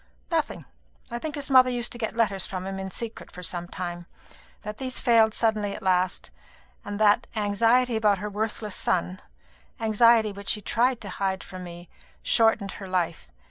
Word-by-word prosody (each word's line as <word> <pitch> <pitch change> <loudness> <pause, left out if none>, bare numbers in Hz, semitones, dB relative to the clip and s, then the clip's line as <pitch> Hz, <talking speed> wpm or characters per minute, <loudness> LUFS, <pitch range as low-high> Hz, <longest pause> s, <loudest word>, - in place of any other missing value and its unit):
"Nothing. - - -1 0.5
I 235 - -3
think 305 +2 -4
his 285 -1 -5
mother 255 -1 +7
used 245 -1 -1
to 240 - -8
get 225 -1 -3
letters 200 -5 +1
from 185 -1 -5
him 195 0 -4
in 190 0 -4
secret 225 +4 -7
for 180 - -10
some 175 0 -3
time; 175 -1 -5 0.6
that 210 +1 -6
these 255 -1 -3
failed 225 -3 +4
suddenly 215 -3 0
at 215 - -9
last; 185 0 0 0.5
and 205 0 -5
that 215 +2 +4
anxiety 230 +4 +2
about 210 -2 +3
her 205 +3 -4
worthless 210 0 -3
son 90 +2 -1 0.6
anxiety 225 0 +4
which 200 0 -6
she - - +2
tried 245 +3 +1
to 205 - -7
hide 190 0 -2
from 185 -1 -9
me 175 0 -10 0.4
shortened 225 -3 +3
her 195 - -8
life. 175 - -2
210 Hz, 180 wpm, -26 LUFS, 190-230 Hz, 0.6 s, mother